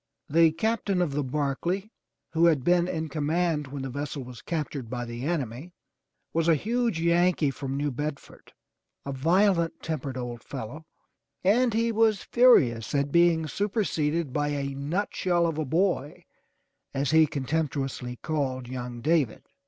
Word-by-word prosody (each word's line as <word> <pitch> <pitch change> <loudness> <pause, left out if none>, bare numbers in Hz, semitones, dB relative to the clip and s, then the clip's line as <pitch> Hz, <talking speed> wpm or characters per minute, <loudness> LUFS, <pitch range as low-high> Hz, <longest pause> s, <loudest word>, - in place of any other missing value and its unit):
The 165 +1 +5
Captain 205 +1 0
of 175 -5 +1
the 145 +1 -1
Barclay 150 - -2 0.4
who 165 +1 +4
had 150 -6 +2
been 175 +2 +3
in 160 -3 -2
command 155 +1 0
when 135 0 -6
the 135 - -4
vessel 145 +1 -4
was 125 -1 -10
captured 145 -7 -4
by 120 0 -3
the 120 +2 -6
enemy, 150 0 -3 0.6
was 165 0 +1
a 165 - +6
huge 230 - 0
Yankee 170 -3 +3
from 135 0 -4
New 145 0 -1
Bedford, 145 +2 -6 0.5
a 140 - -3
violent 170 +5 +2
tempered 140 -5 -3
old 120 -2 -5
fellow, 150 +9 -7 0.6
and 225 +4 +3
he 230 +1 +2
was 220 -3 +2
furious 145 - +4
at 140 0 +1
being 170 -1 +4
superseded 165 - -1
by 145 0 0
a 140 -1 -2
nutshell 175 +4 0
of 160 -2 -1
a 155 - -1
boy 160 -2 0 0.7
as 140 +1 0
he 160 0 +6
contemptuously 140 -4 -2
called 135 -5 -2
young 125 -1 -6
David. 150 -5 +1
155 Hz, 150 wpm, -27 LUFS, 135-175 Hz, 0.7 s, a